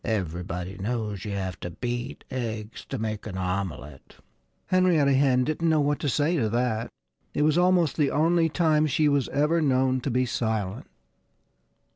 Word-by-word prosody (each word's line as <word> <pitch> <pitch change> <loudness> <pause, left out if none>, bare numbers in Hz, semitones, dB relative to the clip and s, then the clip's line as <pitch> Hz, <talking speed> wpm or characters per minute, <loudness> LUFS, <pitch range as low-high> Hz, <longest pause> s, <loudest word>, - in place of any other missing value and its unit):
"Everybody 90 -2 -3
knows 105 -2 -3
you 105 - -4
have 95 -2 -4
to 90 - -5
beat 120 - -5
eggs 110 -3 -5
to - - -5
make 110 -1 -4
an 95 -3 -5
omelette." 90 -7 -4 0.5
Henrietta 175 -7 +3
Hen 130 -2 +3
didn't 155 +4 0
know 160 -1 +3
what 145 0 +1
to 145 - -1
say 150 +6 +1
to 115 -6 +1
that. 120 0 -1 0.5
It 150 - +2
was 155 0 +3
almost 175 -3 +3
the 145 -3 +3
only 165 +2 +2
time 155 -1 +2
she 150 +1 +2
was 140 -3 +1
ever 150 +4 +2
known 130 -2 +2
to 140 - -2
be 125 +1 +1
silent. 110 -4 -2
125 Hz, 165 wpm, -26 LUFS, 105-150 Hz, 0.5 s, Henrietta